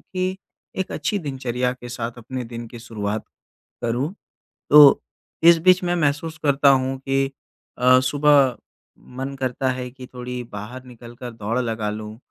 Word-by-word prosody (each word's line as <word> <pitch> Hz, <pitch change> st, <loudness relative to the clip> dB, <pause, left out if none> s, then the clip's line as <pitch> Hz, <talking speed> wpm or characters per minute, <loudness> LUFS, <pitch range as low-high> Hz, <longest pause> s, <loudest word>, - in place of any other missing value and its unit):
कि 185 Hz, 0 st, -3 dB, 0.4 s
एक 190 Hz, -, -2 dB
अच्छी 160 Hz, +7 st, -1 dB
दिनचर्या 130 Hz, -5 st, -2 dB
के 125 Hz, -1 st, -10 dB
साथ 120 Hz, 0 st, -5 dB
अपने 125 Hz, +2 st, -6 dB
दिन 115 Hz, 0 st, -7 dB
की 120 Hz, -, -10 dB
शुरुआत 110 Hz, -2 st, -4 dB, 0.6 s
करूँ। 120 Hz, +8 st, -1 dB, 0.6 s
तो 145 Hz, -1 st, +9 dB, 0.4 s
इस 170 Hz, 0 st, +8 dB
बीच 185 Hz, 0 st, +6 dB
मैं 175 Hz, 0 st, +1 dB
महसूस 160 Hz, 0 st, -1 dB
करता 140 Hz, -1 st, +4 dB
हूँ 135 Hz, 0 st, +2 dB
कि 135 Hz, 0 st, 0 dB, 0.5 s
अ, 130 Hz, +1 st, +6 dB
सुबह 140 Hz, -1 st, +4 dB, 0.6 s
मन 135 Hz, +1 st, -4 dB
करता 130 Hz, 0 st, -1 dB
है 125 Hz, 0 st, -5 dB
कि 130 Hz, 0 st, -11 dB
थोड़ी 125 Hz, 0 st, -5 dB
बाहर 115 Hz, +3 st, -8 dB
निकल 120 Hz, -1 st, -13 dB
कर 120 Hz, 0 st, -7 dB
दौड़ 115 Hz, +2 st, -2 dB
लगा 115 Hz, -3 st, -2 dB
लूँ 105 Hz, +1 st, -6 dB
130 Hz, 155 wpm, -22 LUFS, 120-140 Hz, 0.6 s, तो